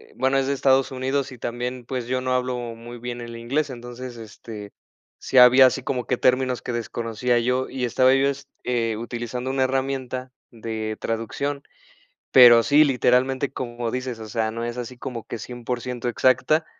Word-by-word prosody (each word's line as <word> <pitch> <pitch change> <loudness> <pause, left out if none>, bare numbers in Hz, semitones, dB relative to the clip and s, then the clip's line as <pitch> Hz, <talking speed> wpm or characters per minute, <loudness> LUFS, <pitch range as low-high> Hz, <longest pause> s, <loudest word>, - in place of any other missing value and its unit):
bueno, 130 +2 +1
es 135 - +1
de 140 - +1
Estados 135 -1 +2
Unidos 135 +1 -2
y 125 - -10
también, 120 +1 -4
pues, 125 -1 -4
yo 130 0 -1
no 130 0 -1
hablo 125 0 0 0.2
muy 120 +1 -10
bien 120 0 -5
el 120 0 -8
inglés. 140 +6 -1
Entonces, 120 0 -8
este, 105 -2 -10 0.5
sí 130 - -2
había 125 +1 +9
así 130 +1 +2
como 125 -2 -2
que 125 - 0
términos 130 0 +2
que 125 - -5
desconocía 120 +1 -1
yo, 125 +2 0
y 130 -1 -2
estaba 130 +2 +4
yo, 135 +1 +3 0.3
eh, 115 -3 -1
utilizando 120 +2 -5
una 135 0 +1
herramienta 130 -1 -2 0.2
de 110 -1 -4
traducción. 140 +6 -3 0.7
Pero 120 -2 +9
sí, 150 +4 +5
literalmente, 130 0 +2
como 120 -2 -4
dices, 125 -1 -4
o 110 - -8
sea, 110 0 -1
no 115 +1 -4
es 120 +1 -5
así 125 +1 -6
como 125 -3 -6
que 120 - -6
100 120 +1 -4
exacta. 130 +6 +2
125 Hz, 175 wpm, -23 LUFS, 120-130 Hz, 0.7 s, había